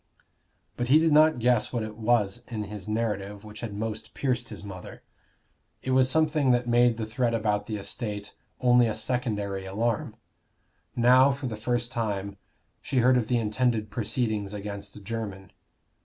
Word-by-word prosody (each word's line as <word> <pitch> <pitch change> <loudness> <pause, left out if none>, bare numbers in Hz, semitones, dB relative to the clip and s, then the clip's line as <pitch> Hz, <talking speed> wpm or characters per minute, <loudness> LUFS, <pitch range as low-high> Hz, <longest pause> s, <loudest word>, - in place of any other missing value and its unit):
But 120 - -1
he 140 +5 +7
did 160 0 +3
not 155 0 +6
guess 120 -2 +2
what 120 -3 -1
it 110 0 -6
was 115 0 +1
in 110 -3 -4
his 105 -1 -8
narrative 105 -2 -2
which 105 0 -10
had 110 -4 -5
most 110 +1 -5
pierced 125 -3 -1
his - - -9
mother. 95 -3 -9 0.8
It 130 - -2
was 130 0 +4
something 150 -2 +2
that 125 -1 +2
made 120 -1 +4
the 110 - -2
threat 115 +1 0
about 105 -2 0
the 110 - -3
estate 105 0 -5 0.3
only 125 -1 +5
a 110 - -1
secondary 105 -5 -2
alarm. 105 +4 -2 0.8
Now, 130 +3 +6
for 140 0 -3
the 120 -3 -3
first 120 +2 -2
time, 100 -4 -2 0.5
she 135 - -3
heard 125 +1 +5
of 120 -3 +1
the 125 - +2
intended 115 0 0
proceedings 110 -3 -2
against 100 0 -7
Jermyn. 100 -3 -5
115 Hz, 165 wpm, -27 LUFS, 105-125 Hz, 0.8 s, he